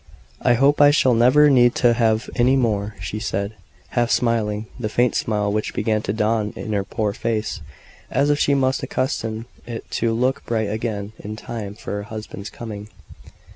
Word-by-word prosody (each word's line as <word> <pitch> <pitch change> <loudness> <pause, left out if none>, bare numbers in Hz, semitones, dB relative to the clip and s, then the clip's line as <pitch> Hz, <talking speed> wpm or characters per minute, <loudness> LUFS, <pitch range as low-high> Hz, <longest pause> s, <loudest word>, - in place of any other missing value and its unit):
"I 120 - +4
hope 140 +4 +3
I 145 - +8
shall 130 -3 +4
never 130 +6 +6
need 120 -2 +5
to 120 -1 +4
have 115 -2 +1
any 125 +1 +4
more," 105 -5 0
she 95 +4 -4
said, 100 -1 -2 0.4
half 120 -1 +1
smiling 110 -3 +1
the 110 -3 -2
faint 120 +3 +2
smile 105 -2 0
which 105 0 -2
began 110 -1 +1
to 100 - -2
dawn 110 0 0
in 110 - -5
her 100 -1 +1
poor 105 +1 -2
face, 110 -5 -2 0.5
as 140 +3 +2
if 145 - +1
she 140 - +3
must 130 0 +1
accustom 115 -4 -2 0.2
it 115 -1 -7
to 115 0 0
look 125 +3 0
bright 110 -3 0
again 105 -2 -3
in 105 +1 -6
time 110 -2 -6
for - - -8
her 105 0 -3
husband's 110 -1 -7
coming. 105 -3 -8
115 Hz, 180 wpm, -22 LUFS, 105-120 Hz, 0.5 s, I